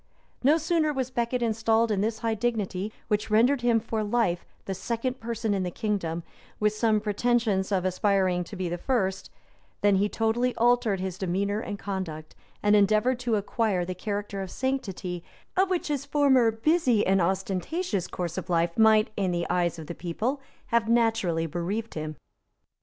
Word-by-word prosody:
No 295 +5 +5
sooner 320 -1 +1
was 260 -3 -2
Becket 240 0 -1
installed 225 0 +2
in 200 -2 +1
this 220 +1 -1
high 225 - +2
dignity, 210 -3 -2 0.2
which 210 0 0
rendered 240 +5 +4
him 240 -1 +3
for 220 -1 -2
life 205 -5 0 0.2
the 195 - -3
second 235 +7 -3
person 230 -2 -2
in 195 - 0
the 180 - -1
kingdom, 175 -4 -2 0.4
with 210 0 +2
some 215 0 +2
pretensions 210 -2 +1
of 185 -2 +1
aspiring 185 -1 +1
to 200 - -9
be 185 -1 -2
the 175 +1 -3
first, 195 -7 -1 0.5
than 205 -1 +4
he 205 +2 +2
totally 235 +3 0
altered 235 -4 +2
his 185 0 -4
demeanor 200 +2 0
and 205 -2 -5
conduct, 185 -6 -5 0.3
and 210 0 +5
endeavored 215 +5 +3
to 240 -3 0
acquire 205 -3 0
the 185 - -3
character 205 +1 -4
of 190 - -5
sanctity, 190 -10 -3 0.3
of 380 0 +3
which 365 -2 -1
his 290 -3 -1
former 280 -4 +4
busy 245 -1 +2
and 190 0 +3
ostentatious 190 - -1
course 175 0 -3
of 185 - -9
life 170 -1 +1
might, 220 -1 +5
in 195 -3 0
the 175 -1 -1
eyes 175 -2 +1
of 160 - -7
the 170 - -6
people, 220 - -3 0.3
have 230 -1 +2
naturally 225 -8 +2
bereaved 180 +8 -3
him. 155 0 -4
210 Hz, 175 wpm, -27 LUFS, 185-235 Hz, 0.5 s, No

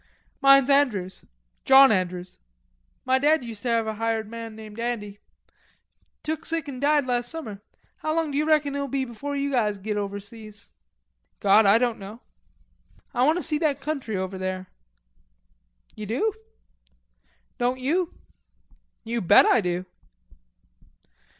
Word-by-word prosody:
"Mine's 275 -1 +6
Andrews, 215 -10 +1 0.4
John 270 -1 +8
Andrews." 180 -2 -2 0.7
"Ma 260 +1 +3
dad 300 +1 +3
uster 230 0 -5
have 230 -1 +2
a 220 - -2
hired 225 0 -2
man 230 0 -8
named 215 0 -10
Andy. 210 -4 -4 1.0
Took 315 +1 -3
sick 325 -2 -3
an' 265 -3 -6
died 290 0 +2
last 245 -1 -1
summer. 220 -12 -7 0.4
How 310 0 -2
long 325 -2 0
d'ye 285 +2 +1
reckon 305 -2 +2
it'll 280 0 -2
be 270 0 -1
before 270 +4 -6
us 280 0 -1
guys 215 -6 +1
git 210 +2 -3
overseas?" 205 +1 -7 0.7
"God, 205 +1 +5
I 200 +3 +6
don't 240 -1 0
know." 205 +4 -9 0.9
"Ah 250 +2 +2
want 315 +3 +3
to 360 - -3
see 305 -2 +1
that 295 -4 0
country 275 -7 -3
over 190 0 -4
there." 185 0 -4 1.2
"You 210 - -7
do?" 285 - 0 1.3
"Don't 250 +1 0
you?" 330 +7 0 0.9
"You 230 0 -2
bet 175 - +6
I 240 - +4
do." 180 0 -2
240 Hz, 140 wpm, -25 LUFS, 210-280 Hz, 1.3 s, John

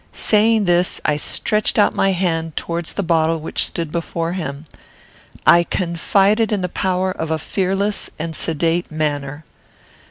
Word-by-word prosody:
Saying 215 0 +3
this, 175 +1 +2
I 150 - +2
stretched 210 +7 0
out 205 - +4
my 195 - +2
hand 165 -4 -1
towards 170 -1 -3
the 200 - -2
bottle 165 -1 +1
which 155 - -1
stood 165 -3 -2
before 170 0 -3
him. 150 -5 -5 0.8
I 170 - +7
confided 195 +6 +1
in 205 -3 0
the 180 - -2
power 185 0 -1
of 160 -3 -4
a 160 - 0
fearless 195 +4 -1
and 160 0 -5
sedate 165 +2 0
manner. 145 -1 -3
170 Hz, 150 wpm, -19 LUFS, 160-195 Hz, 0.8 s, I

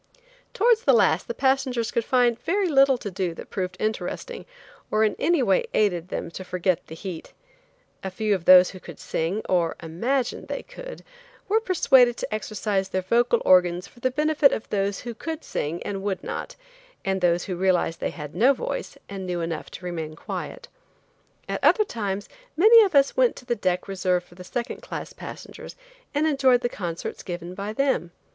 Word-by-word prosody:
Towards 460 +1 +4
the - - +5
last - - +3
the 475 - -4
passengers 265 -3 +1
could 235 - 0
find 240 -1 +2
very 390 +6 +1
little 275 -4 +5
to 205 -4 -6
do 180 -2 -2
that - - -10
proved 185 -2 -3
interesting 215 - -4 0.4
or 215 0 +2
in 215 - +2
any 325 -2 +2
way 195 -5 +2
aided 180 -5 +1
them - - -5
to 185 - -7
forget 180 -1 -1
the 160 - -9
heat. 175 -1 -8 0.7
A 190 - -2
few 210 +3 0
of 180 -4 -2
those 185 0 +8
who 185 - -10
could 170 -3 -11
sing, 175 +7 -2
or 175 -3 +1
imagined 235 +11 -2
they - - -4
could, - - -10 0.4
were 435 +3 +3
persuaded 265 - +4
to - - -4
exercise 210 -2 -2
their 185 -1 -2
vocal 235 +4 +2
organs 180 0 +4
for - - -18
the 255 - +1
benefit 300 +1 +3
of 220 - -3
those 200 -1 -1
who 240 -1 -6
could 320 +7 -6
sing 160 +4 -3
and 195 -1 -4
would 195 -2 -3
not, - - -5 0.5
and 190 -1 0
those 175 0 +2
who 185 - -4
realized 175 -2 +1
they - - -1
had 150 -2 -8
no 260 +5 +4
voice - - -5
and 195 -2 -6
knew 175 -1 -2
enough 165 -1 -4
to 180 - -10
remain 160 -3 -4
quiet. - - -6 0.8
At - - -4
other 430 - +5
times 205 - -4 0.3
many 445 +6 +8
of 385 -7 -1
us 275 0 +4
went - - +3
to - - -12
the 240 -1 0
deck 185 -4 -1
reserved 185 -2 0
for - - -19
the 180 +1 -11
second 235 +6 -4
class - - -7
passengers - - -10 0.4
and 295 +2 +1
enjoyed 270 -5 +3
the 240 - 0
concerts 175 -6 -5
given 175 -1 -6
by 200 +2 -5
them. 265 -7 0
205 Hz, 190 wpm, -25 LUFS, 180-265 Hz, 0.8 s, those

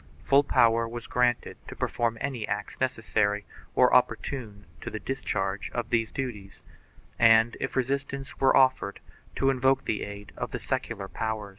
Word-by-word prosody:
Full 140 +4 +5
power 115 -4 +3
was 120 0 -7
granted 125 -1 0
to - - -8
perform 115 -1 -1
any 125 -6 -3
acts 105 +4 -4
necessary 105 -5 0 0.3
or - - +5
opportune 105 -7 0 0.2
to - - -5
the 110 - -5
discharge 95 -5 -2
of 120 0 -3
these 115 -2 +1
duties 105 -7 -6 0.6
and, 115 0 +6
if - - -3
resistance 135 +1 -2
were 135 - +5
offered, 130 -6 +3 0.4
to 135 - +3
invoke 135 +1 +2
the 105 - -1
aid 100 0 -7
of - - -4
the - - -4
secular 100 -1 -3
power. 110 -1 -3
115 Hz, 155 wpm, -27 LUFS, 105-130 Hz, 0.6 s, and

